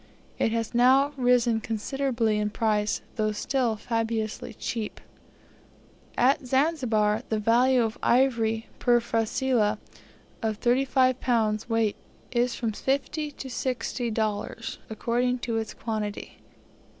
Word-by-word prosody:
It 225 - +2
has 230 0 -2
now 260 +4 +5
risen 245 -3 +3
considerably 230 0 -1
in 210 0 0
price, 210 -1 0
though 215 -1 +1
still 240 +1 0
fabulously 225 -1 -2
cheap. 225 -3 -4 1.2
At 260 +1 +3
Zanzibar 245 -7 +2
the 220 - +1
value 240 +4 +3
of 225 0 -3
ivory 230 -3 +2
per 240 -1 +4
frasilah 225 -1 +1 0.6
of 220 -2 -1
35 255 +1 +2
lbs. 220 -3 0
weight 225 -2 +1 0.3
is 245 0 +1
from 230 -2 -2
$50 280 +5 -2
to 270 - -6
$60, 230 -4 -2
according 240 +3 0
to 235 -2 -2
its 220 -1 -4
quality. 215 -2 -4
230 Hz, 115 wpm, -26 LUFS, 220-255 Hz, 1.2 s, now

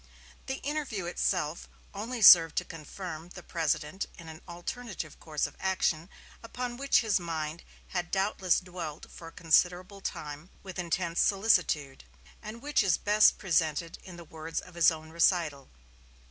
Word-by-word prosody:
The 265 - -2
interview 280 - -3
itself 170 -2 -1 0.2
only 225 +3 -4
served 165 -4 +9
to - - 0
confirm 165 +1 -8
the 180 -1 -11
President 160 +2 -2
in 165 -2 -10
an 160 +1 -10
alternative 175 - -6
course 155 -2 -2
of - - -8
action 185 -3 0 0.3
upon 245 +1 -5
which 275 +1 +3
his 215 -5 +1
mind 160 -1 -4 0.3
had 175 -1 -3
doubtless 190 -2 +1
dwelt 175 -5 -8
for 165 - -11
a - - -10
considerable 180 +4 +1
time 150 0 -6
with 190 -1 -7
intense 170 0 -1
solicitude, 180 -9 +2 0.4
and 220 +3 -9
which 295 0 +2
is 190 -5 +2
best 210 +1 +4
presented 165 -2 0
in 185 -2 -10
the 170 - -10
words 160 +1 -5
of 180 - -12
his 170 -1 +5
own 160 -1 -7
recital. 165 -5 +1
175 Hz, 150 wpm, -29 LUFS, 160-195 Hz, 0.4 s, served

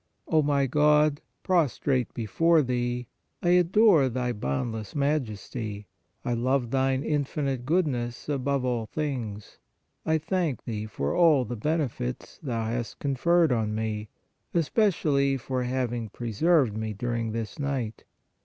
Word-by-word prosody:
O 160 -1 +3
my 140 -1 +2
God, 150 +2 +3 0.2
prostrate 145 - +1
before 160 +8 +3
Thee, 125 -1 -1 0.4
I 175 - +2
adore 180 -4 +5
Thy 125 0 -1
boundless 105 - -3
Majesty; 115 -7 -2 0.4
I 120 - 0
love 125 0 0
Thine 135 0 +1
infinite 140 -3 -1
Goodness 135 -8 0
above 140 -2 0
all 120 -3 -1
things; 120 -8 -4 0.4
I 160 0 +2
thank 160 -3 -1
Thee 110 -2 -4
for 70 -9 -2
all 155 -7 +5
the 120 +2 -4
benefits 135 - -3
Thou 115 -6 -2
hast 115 +1 -3
conferred 160 +4 +2
on 110 -3 0
me, 110 -1 -3 0.5
espe 175 +7 +3
cially 140 -6 +1
for 130 0 -2
having 120 -3 -2
preserved 120 - +1
me 110 0 -3
during 115 0 -2
this 115 +6 -5
night. 130 -7 -3
130 Hz, 130 wpm, -27 LUFS, 115-150 Hz, 0.5 s, adore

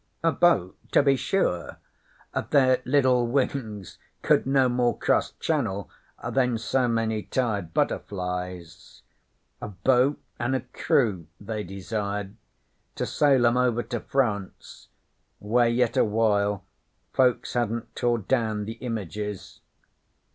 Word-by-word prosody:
'A 165 - +4
boat, 155 - +2 0.2
to - - +5
be 140 -1 +4
sure. 110 - -1 0.7
Their 130 -3 +4
liddle 130 -2 +3
wings 115 -6 -2 0.2
could - - +3
no 135 -1 +4
more 120 -1 +1
cross - - +1
Channel 110 - -2 0.4
than 125 -3 +1
so 125 +3 0
many 115 -2 0
tired 105 -9 -2
butterflies. 90 -2 -3 0.6
A - - -4
boat 125 +8 +2 0.2
an' 120 +2 0
a 130 - -1
crew 115 - 0
they 105 +1 -4
desired 100 +1 -4 0.6
to - - -2
sail 135 -5 +3
'em 120 +1 +3
over 120 -2 +2
to 120 - -4
France, 110 -9 -3 0.5
where 115 +3 +2
yet 120 0 +1
awhile 105 -2 +1 0.5
folks 125 -2 +2
hadn't 115 -1 -2
tore 120 -1 +1
down 110 -1 -1
the 110 +2 -7
Images. 105 -4 -5
115 Hz, 120 wpm, -26 LUFS, 100-125 Hz, 0.7 s, to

